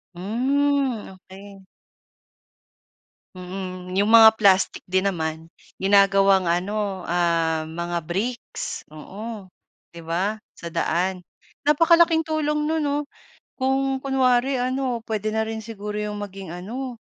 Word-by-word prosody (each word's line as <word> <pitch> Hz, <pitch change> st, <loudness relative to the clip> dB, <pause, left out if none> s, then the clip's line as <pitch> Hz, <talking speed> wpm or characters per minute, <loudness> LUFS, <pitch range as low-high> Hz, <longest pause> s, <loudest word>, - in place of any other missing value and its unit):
Hmm, 260 Hz, +5 st, 0 dB
okey. 195 Hz, +1 st, -14 dB, 1.7 s
Mm, 185 Hz, 0 st, -7 dB
'yong 205 Hz, -, +3 dB
mga 225 Hz, 0 st, +9 dB
plastic 195 Hz, -2 st, +4 dB
din 190 Hz, +2 st, +1 dB
naman, 160 Hz, -1 st, -5 dB, 0.2 s
ginagawang 195 Hz, -1 st, +4 dB
ano, 190 Hz, +2 st, -1 dB
ah, 165 Hz, -2 st, 0 dB
mga 170 Hz, +1 st, -3 dB
bricks. 230 Hz, +8 st, -4 dB
Oo, 195 Hz, +6 st, -9 dB, 0.4 s
'di 170 Hz, -, -11 dB
ba, 190 Hz, +6 st, -1 dB, 0.2 s
sa 170 Hz, -1 st, -8 dB
daan. 175 Hz, +3 st, 0 dB, 0.5 s
Napakalaking 330 Hz, +1 st, +5 dB
tulong 300 Hz, -1 st, -1 dB
no'n, 320 Hz, +1 st, 0 dB
'no? 290 Hz, -1 st, 0 dB, 0.5 s
Kung 265 Hz, 0 st, 0 dB
kunwari 260 Hz, -1 st, +2 dB
ano, 255 Hz, -1 st, -1 dB
puwede 215 Hz, -1 st, -3 dB
na 220 Hz, 0 st, -1 dB
rin 220 Hz, 0 st, -5 dB
siguro 210 Hz, -1 st, -6 dB
'yong 210 Hz, 0 st, -3 dB
maging 195 Hz, -3 st, -7 dB
ano, 235 Hz, +8 st, -6 dB
205 Hz, 110 wpm, -23 LUFS, 185-255 Hz, 1.7 s, mga